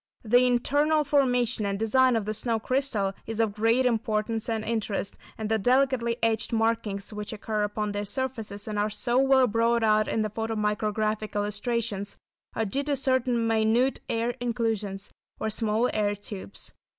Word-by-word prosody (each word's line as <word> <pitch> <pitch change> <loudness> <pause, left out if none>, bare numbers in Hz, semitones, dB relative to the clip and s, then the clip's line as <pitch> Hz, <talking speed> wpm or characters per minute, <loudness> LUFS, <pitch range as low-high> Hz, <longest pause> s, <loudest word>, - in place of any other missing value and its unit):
The 245 +3 +4
internal 290 +5 +2
formation 250 -5 +2
and 200 -1 -1
design 250 +4 +3
of 220 -3 0
the 215 - -2
snow 225 +1 0
crystal 225 -6 0
is 225 0 -4
of 220 -3 +2
great 225 +4 +2
importance 225 -1 0
and 220 -1 -1
interest, 215 -3 -2 0.2
and 220 - -3
the 220 0 +1
delicately 250 0 +2
etched 220 -1 +1
markings 225 -3 -1
which 210 0 -5
occur 215 0 -3
upon 210 0 -1
their 205 0 -2
surfaces, 225 -4 -4
and 210 -1 -2
are 210 +1 +1
so 240 +4 +1
well 270 -1 +5
brought 230 +1 +2
out 215 -1 +3
in 220 - 0
the 215 - -3
photo 225 +1 -3
micrographic 215 0 -1
illustrations, 205 0 -2 0.4
are 225 - 0
due 240 +8 -1
to 290 -1 +1
certain 255 -3 +1
minute 225 +4 +2
air 230 +1 0
inclusions 220 -5 -2 0.3
or 220 - -2
small 220 +2 +1
air 205 -1 +1
tubes. 205 -1 -8
225 Hz, 165 wpm, -27 LUFS, 210-245 Hz, 0.4 s, well